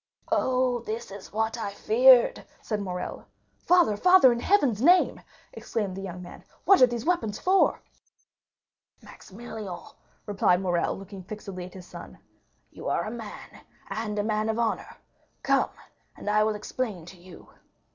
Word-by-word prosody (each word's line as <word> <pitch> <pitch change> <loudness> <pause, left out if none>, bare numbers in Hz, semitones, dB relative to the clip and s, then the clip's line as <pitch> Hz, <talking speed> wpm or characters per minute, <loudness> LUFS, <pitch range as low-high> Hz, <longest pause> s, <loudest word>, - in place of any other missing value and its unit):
"Oh, 255 -1 +1
this 225 -1 -6
is 200 0 -10
what 220 +2 -1
I 200 -2 -5
feared!" 245 +3 +5 0.2
said 210 -2 -3
Morrel. 180 -2 -6 0.3
"Father, 350 -12 +3
father, 360 - +6
in 235 - -4
Heaven's 260 - +2
name," 355 +6 +4 0.3
exclaimed 205 -5 -4
the 195 - -6
young 180 -2 -7
man, 175 - -12 0.2
"what 390 - +6
are 255 - +8
these 240 -1 -5
weapons 330 - 0
for?" 380 +1 +2 1.2
"Maximilian," 205 -3 -9 0.5
replied 195 -3 +2
Morrel, 175 -2 -1
looking 195 0 -10
fixedly 190 -1 -8
at 180 - -13
his 185 -1 -10
son, - - -11 0.5
"you - - -6
are - - 0
a 215 - -5
man, 225 -3 -10 0.3
and 215 -1 -3
a 205 - 0
man 215 0 -1
of 220 - -1
honor. 230 -2 -2 0.5
Come, - - +2 0.5
and - - -11
I 210 +1 +3
will 215 -1 0
explain 210 -4 -4
to 180 +2 -13
you." 175 0 -15
215 Hz, 155 wpm, -26 LUFS, 195-240 Hz, 1.2 s, are